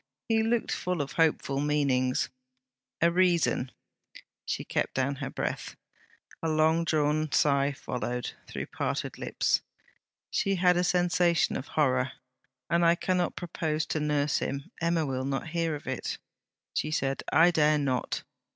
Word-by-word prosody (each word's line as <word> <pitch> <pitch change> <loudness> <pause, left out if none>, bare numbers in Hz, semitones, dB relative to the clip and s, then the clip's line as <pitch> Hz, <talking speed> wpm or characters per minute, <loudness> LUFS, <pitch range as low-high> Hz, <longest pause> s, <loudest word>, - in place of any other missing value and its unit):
He 225 -1 +3
looked 225 +1 0
full 180 -1 -1
of 140 -1 -2
hopeful 155 -4 +1
meanings. 140 -3 +1 0.7
'A 170 +1 +5
reason...!' 170 -7 +2 0.8
She - - -2
kept - - -2
down 135 +2 0
her 135 0 -4
breath. - - -4 0.7
A 165 - -1
longdrawn 155 -1 +2
sigh 140 -1 +3
followed, 125 -2 -4 0.2
through - - -5
parted - - -3
lips. - - +1 0.7
She 195 0 +1
had 180 -1 +4
a 175 - +2
sensation 175 -1 +2
of 135 - -4
horror. 130 -3 +2 0.5
'And 170 0 +2
I 170 0 +5
cannot 180 0 0
propose 160 -3 -2
to 155 - 0
nurse 150 -1 +1
him 140 +6 -4
Emma 165 -1 +1
will 130 -2 -2
not 135 +3 -2
hear 165 -1 0
of 145 - -9
it,' 130 -1 -3 0.6
she 150 - -1
said. 135 -3 -1
'I 165 +3 +6
dare 155 -2 +4
not. 130 -4 -1
155 Hz, 140 wpm, -28 LUFS, 140-170 Hz, 0.8 s, I